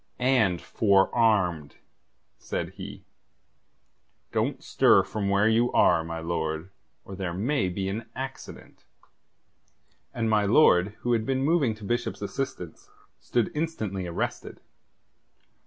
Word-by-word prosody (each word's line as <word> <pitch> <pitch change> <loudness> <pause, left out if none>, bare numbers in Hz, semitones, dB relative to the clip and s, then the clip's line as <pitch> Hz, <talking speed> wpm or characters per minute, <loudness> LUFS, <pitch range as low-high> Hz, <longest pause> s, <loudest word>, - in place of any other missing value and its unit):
"And 125 -9 +2
forearmed," 100 -7 +2 0.6
said - - -4
he. - - -10 1.3
"Don't - - -1
stir - - +4
from 100 -2 -3
where 100 +2 +3
you 115 +2 +2
are, 85 -2 +4
my 85 0 -5
lord, 80 +1 -3 0.3
or 95 - -8
there 90 -3 -4
may 110 0 0
be 95 +1 -3
an 110 +3 -5
accident." 135 0 -8 1.3
And 115 -1 -2
my 105 -1 +3
lord, 100 -4 +4
who 120 - 0
had 115 -2 +1
been 130 +3 -1
moving 145 -7 +2
to 105 - -14
Bishop's 120 0 -2
assistance, 100 - -5 0.3
stood 120 -3 -1
instantly 110 - -3
arrested. 85 - -4
105 Hz, 120 wpm, -26 LUFS, 90-120 Hz, 1.3 s, stir